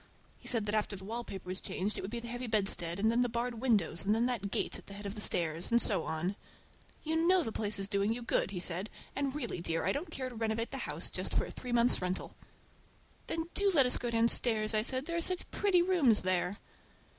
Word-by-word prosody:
He - - -13
said 230 -4 +1
that 210 - -1
after 210 -1 0
the 190 0 -9
wallpaper 220 -3 -5
was 185 +1 -4
changed 200 +3 -2
it - - -4
would 190 - -5
be 235 +2 -3
the 235 - -8
heavy 245 +1 -4
bedstead, 195 -6 +1
and 220 +2 +3
then 235 +1 +2
the 245 - +2
barred 235 0 -2
windows, 195 -10 +1
and 210 +2 +2
then 230 +2 +2
that 235 -5 -1
gate - - -1
at - - -17
the 200 - -8
head 205 0 -8
of 200 - -4
the 210 - -6
stairs, 165 -4 0
and 235 - +5
so 210 -4 +3
on. 175 +5 -2 0.7
"You 320 +1 0
know 370 -1 +5
the 225 - -3
place 215 -1 -1
is 195 0 0
doing 200 +1 +1
you 240 +1 -3
good," 235 - +1
he 190 -2 -4
said, 180 +4 -2 0.3
"and 280 0 -1
really, 240 - -3
dear, 165 -1 -1
I 190 - +3
don't 300 - -3
care 260 -1 -4
to - - -11
renovate 225 0 -2
the 270 - -4
house - - -4
just - - -2
for - - +2
a - - -8
three 250 - -7
months' 240 -2 +4
rental." 180 +1 -3 0.9
"Then 330 0 -3
do 400 0 +2
let 275 -4 +6
us 250 - +4
go 240 - -2
downstairs," 230 -1 +3
I 215 - +3
said, 260 +4 +2
"there 335 +1 -2
are - - 0
such 365 +1 0
pretty 370 -4 +3
rooms 315 - +4
there." 185 +1 +1
225 Hz, 250 wpm, -32 LUFS, 195-250 Hz, 0.9 s, let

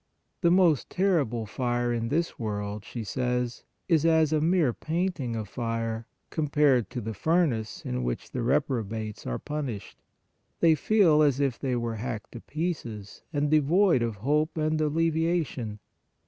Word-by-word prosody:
The 170 - +4
most 175 -5 +4
terrible 150 - +1
fire 120 +2 -1
in 115 -1 -1
this 165 +6 -1
world, 105 -2 -3
she 120 - -6
says, 125 +2 -2 0.2
is 160 -4 +3
as 160 -2 +4
a 155 - +2
mere 165 -6 +3
painting 160 -7 -2
of 110 -2 -4
fire 115 -1 -3 0.2
compared 145 -5 +2
to 120 - -4
the 110 +1 -4
furnace 150 - 0
in 60 0 -2
which - - -3
the 125 - -3
reprobates 115 -5 -1
are - - -1
punished. 140 -9 -5 0.6
They 165 -1 +6
feel 165 -3 +4
as 145 -3 +3
if 135 -4 0
they 130 -3 -1
were 115 -2 -2
hacked 110 -1 -5
to 120 - -9
pieces, 130 - -4
and 145 -1 0
devoid 155 +1 +4
of 115 -2 -1
hope 150 +3 +1
and 155 0 +1
alleviation. 160 -7 0
135 Hz, 150 wpm, -27 LUFS, 115-160 Hz, 0.6 s, They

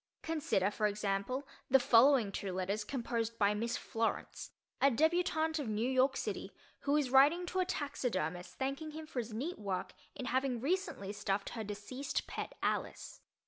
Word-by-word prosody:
Consider, 305 - +1
for 210 0 +1
example, 205 +6 -2 0.2
the 270 +1 +7
following 245 -3 +5
two 195 0 -3
letters 190 +3 -1
composed 230 -1 -2
by 205 -1 +3
Miss 230 +3 -1
Florence......, 225 0 -2 0.3
a 275 - +7
debutante 320 +2 +2
of 270 -6 -3
New 215 +3 0
York 265 +1 +3
City, - - -3 0.3
who 285 +1 +2
is 275 -4 0
writing 295 +7 +6
to 370 +1 -2
a 370 - +3
taxidermist 185 - -2
thanking 275 +4 -3
him 315 0 -6
for 290 -5 -4
his 230 -1 -4
neat 275 +12 -4
work 195 -3 -3 0.2
in 260 - -5
having 260 -1 0
recently 310 - -1
stuffed 200 -1 -1
her 225 -2 -5
deceased 210 +8 -4
pet - - -5
Alice. - - -2
250 Hz, 165 wpm, -34 LUFS, 210-285 Hz, 0.3 s, the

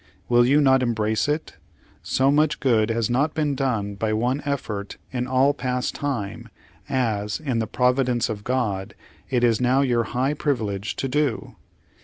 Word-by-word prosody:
Will 120 0 +4
you 145 +3 +4
not 130 -2 +4
embrace 110 -2 0
it? 150 +2 -3 0.4
So 135 +1 +2
much 150 +1 +2
good 115 -5 +2
has 115 -1 0
not 140 +6 0
been 150 -2 0
done 115 -7 -1
by 110 +2 -1
one 125 +6 0
effort 110 -8 -4
in 125 -1 -2
all 130 +2 +3
past 125 -1 -2
time, 115 -5 -4 0.4
as, 110 -6 -1
in 135 -7 -1
the 110 - -1
Providence 125 -1 +1
of 105 -3 -5
God, 105 -7 -2 0.3
it 125 -2 +1
is 115 -1 +3
now 130 +2 +3
your 120 -4 +1
high 130 +5 0
privilege 110 -9 -2
to 135 - -2
do. 140 -2 -1
125 Hz, 165 wpm, -23 LUFS, 110-135 Hz, 0.4 s, Will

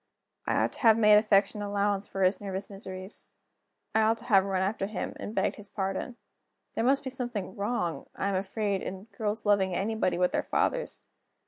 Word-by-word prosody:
I - - +1
ought - - +2
to - - -6
have 225 -3 +6
made 210 -2 +7
affectionate 205 0 +2
allowance 200 0 0
for 195 - -2
his 185 +3 +2
nervous 195 0 -5
miseries; 190 0 -7 0.6
I 220 - +4
ought 220 +1 +3
to - - -14
have 195 -4 +5
run 190 -1 0
after 195 0 -1
him, 210 -2 -4
and 215 - -6
begged - - +1
his 205 -1 -9
pardon. 195 +5 -3 0.6
There - - -1
must 270 +3 +3
be 260 - -4
something 240 -7 -4
wrong, 200 -5 -2
I 195 - -1
am - - -1
afraid, 195 +1 -1
in 190 0 -6
girls 215 +1 -2
loving 195 -3 +3
anybody 205 -2 0
but 180 0 +2
their - - +1
fathers. - - -1
205 Hz, 195 wpm, -29 LUFS, 190-220 Hz, 0.6 s, made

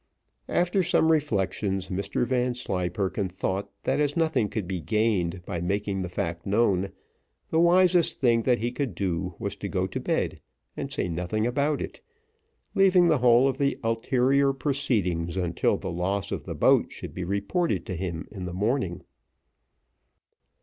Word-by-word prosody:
After 180 +2 +2
some 160 -2 +3
reflection, 100 - 0
Mr 95 +5 -2
Vanslyperken 105 -6 -1
thought 95 +2 -3
that - - +1
as 145 +1 +1
nothing 160 -10 +1
could 105 -5 -3
be 90 -2 -3
gained 95 -1 0
by 85 -4 -4
making 100 +2 -1
the 90 - -4
fact 85 -1 -3
known, 100 -2 +2 0.6
the 160 - +3
wisest 175 0 +4
thing 120 -3 +3
that 125 +1 +2
he 120 +1 -2
could 125 -6 -3
do 90 -1 -2
was - - -3
to - - -5
go - - 0
to - - -4
bed - - -1 0.3
and - - -5
say - - -1
nothing 90 +6 -1
about 140 +4 0
it, - - -9 0.7
leaving 185 -3 +5
the 155 -4 +3
whole 125 +1 +5
of 135 -1 -2
the 140 -1 +1
ulterior 130 +4 +2
proceedings 105 - -1
until 85 -2 +1
the 95 - -5
loss 95 +3 -2
of - - -4
the - - -5
boat - - +4
should - - -8
be 95 - -4
reported 100 - -1
to 95 - -4
him 85 -2 -4
in 95 -4 -6
the 90 - -5
morning. 105 -2 -1
105 Hz, 160 wpm, -26 LUFS, 90-135 Hz, 0.7 s, leaving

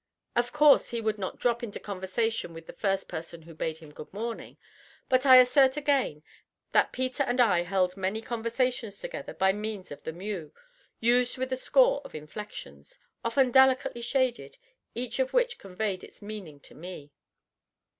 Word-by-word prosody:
_ - - -59 0.3
Of 240 0 +1
course 300 -1 +5
he 235 - -2
would 215 -2 -1
not 185 - -4
drop 235 0 +1
into 230 -4 -5
conversation 200 -1 -2
with 165 0 -10
the - - -10
first 195 +1 -1
person 165 0 -7
who 165 +1 -12
bade 160 0 -3
him 160 -2 -13
"good 150 - -10
morning," 230 +3 -6 0.5
but 255 +1 +3
I 260 - +10
assert 260 +2 +5
again 275 - 0 0.5
that - - +3
Peter 255 +1 -2
and 255 -2 0
I 200 -8 +5
held 180 0 0
many 195 +2 -2
conversations 230 -1 -2
together - - -7
by 190 0 +3
means 210 -2 -5
of 145 - -8
the - - -5
"mew," 180 -2 -6 0.4
used 245 +2 +2
with 260 0 -2
a - - +2
score - - +3
of - - -11
inflections, 150 - -9 0.3
often 250 +2 +2
delicately 260 -2 +4
shaded, 255 - -1 0.4
each 245 +1 -3
of 260 0 0
which - - +1
conveyed 195 0 -3
its - - -14
meaning 205 -8 -8
to - - -12
me. 155 -3 -9
220 Hz, 175 wpm, -28 LUFS, 185-255 Hz, 0.5 s, I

